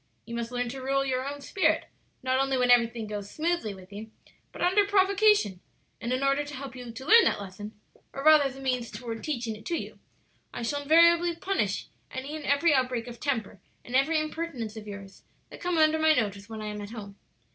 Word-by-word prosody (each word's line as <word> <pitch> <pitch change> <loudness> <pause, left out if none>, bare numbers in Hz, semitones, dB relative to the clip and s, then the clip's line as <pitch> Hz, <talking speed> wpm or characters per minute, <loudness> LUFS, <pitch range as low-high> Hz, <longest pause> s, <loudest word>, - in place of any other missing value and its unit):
You 235 - -8
must 235 0 -3
learn 245 0 -1
to 265 +2 -6
rule 275 +1 0
your 260 0 -1
own 285 0 -8
spirit, 375 +7 +1 0.4
not 260 0 +1
only 270 -1 +1
when 250 -1 +3
everything 235 -2 +3
goes 205 -1 -6
smoothly 325 -7 -1
with 190 +1 -14
you, 215 +2 -8 0.4
but - - -5
under 375 +3 +4
provocation; 400 - +3 0.4
and 235 - -3
in 255 +2 0
order 275 +1 +2
to 290 0 -8
help 265 0 -7
you 245 -2 -8
to 235 +4 -9
learn 460 +6 +8
that - - +1
lesson 205 +2 -9 0.3
or 275 - -6
rather 310 -1 +7
as 270 -1 -3
a 270 - -10
means 250 -3 -1
toward 230 -3 -6
teaching 240 -7 -3
it 215 - -13
to 340 - 0
you - - -7 0.6
I 240 - -4
shall 285 +5 -1
invariably 335 +3 +5
punish 335 - -1 0.2
any 270 +4 -6
and 305 -2 -7
every 290 +3 +3
outbreak 255 -3 0
of 240 -1 -9
temper 225 -9 -2 0.2
and 245 - -5
every 310 +4 +3
impertinence 310 -8 -4
of 215 -1 -9
yours 200 -1 -9 0.3
that - - -11
come 355 -1 0
under 315 0 +4
my 315 0 +5
notice 205 -3 -2
when 220 -1 -6
I - - -4
am 210 0 -6
at 205 - -7
home. 205 -3 -9
260 Hz, 220 wpm, -28 LUFS, 225-310 Hz, 0.6 s, learn